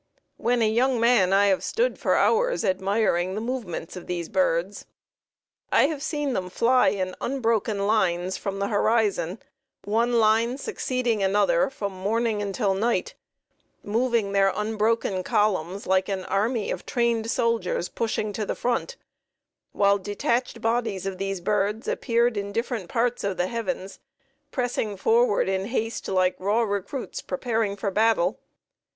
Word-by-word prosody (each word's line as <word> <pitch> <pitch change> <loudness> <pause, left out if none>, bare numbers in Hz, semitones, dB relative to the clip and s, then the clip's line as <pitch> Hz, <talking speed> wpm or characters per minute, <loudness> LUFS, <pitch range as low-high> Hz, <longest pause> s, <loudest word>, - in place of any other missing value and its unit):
When 240 0 +1
a - - +3
young 245 +3 +2
man 230 -6 +4
I 200 +1 +5
have 190 - +1
stood - - 0
for - - +2
hours 485 - +2
admiring 190 -1 +1
the - - -2
movements 220 -9 -4
of 180 - -9
these 175 -2 -3
birds. 185 0 0 0.8
I - - +5
have 295 -1 -2
seen 295 -2 -2
them 185 -5 -2
fly 250 +7 +3
in 185 -1 -1
unbroken 225 -5 0
lines 185 -4 +1
from 195 -1 -4
the 200 0 -1
horizon, 205 -4 +1 0.5
one 230 +4 +1
line 230 +2 +3
succeeding 250 -5 -1
another 210 +8 +2
from 205 -7 -4
morning 215 +3 -1
until 200 0 0
night, 225 +5 0 0.7
moving 230 -1 0
their 195 -1 +3
unbroken 215 -2 0
columns 195 -1 0
like 190 +1 +1
an 190 -2 -3
army 215 +3 0
of - - -4
trained 235 -3 0
soldiers 230 -7 0
pushing 215 -2 -2
to 215 - -2
the - - -3
front, 245 - -2 0.7
while 200 0 +3
detached 230 +4 -2
bodies 225 -5 -1
of 195 -1 -4
these 195 -1 -3
birds 210 +3 0
appeared 235 -2 +1
in 200 0 -3
different 230 -4 -3
parts 240 +1 0
of 200 -2 -2
the 180 - +1
heavens, 230 -2 -4 0.5
pressing 245 -6 -2
forward 225 +1 +3
in 190 0 -1
haste 225 0 -3
like 185 -1 +2
raw 210 +5 +1
recruits 205 +5 -4
preparing 225 -6 -1
for 200 0 -2
battle. 210 -3 +2
215 Hz, 145 wpm, -25 LUFS, 195-235 Hz, 0.8 s, I